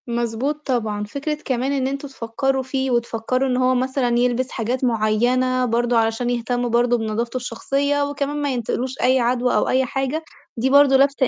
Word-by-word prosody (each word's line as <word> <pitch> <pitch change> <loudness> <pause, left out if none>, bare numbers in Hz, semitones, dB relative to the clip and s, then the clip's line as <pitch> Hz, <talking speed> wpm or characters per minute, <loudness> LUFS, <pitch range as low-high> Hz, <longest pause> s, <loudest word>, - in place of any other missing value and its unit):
مضبوط 240 +5 -2
طبعًا. 220 -5 -1
فكرة 280 +8 -3
كمان 260 +1 -1
إن 270 -2 0
أنتم 275 +1 -4
تفكّروا 265 +1 -2
فيه 265 0 -2
وتفكّروا 235 +2 0
إن 250 - +1
هو 255 0 +3
مثلًا 250 -1 0
يلبس 250 +1 0
حاجات 245 +2 -2
معيّنة، 245 +3 +1
برضه 240 0 +1
علشان 225 +2 +1
يهتمّوا 245 0 -1
برضه 240 +1 +2
بنضافته 230 +2 -2
الشخصية، 275 +4 -1
وكمان 285 0 -3
ما 285 -2 0
ينتقلوش 245 +1 -2
أي 255 +1 +4
عَدوَى 245 +1 +1
أو - - +1
أي 260 0 +2
حاجة، 270 +5 -2 0.3
دي 250 +3 +1
برضه 280 -1 +6
لفتة 275 -1 +3
255 Hz, 170 wpm, -21 LUFS, 235-270 Hz, 0.3 s, برضه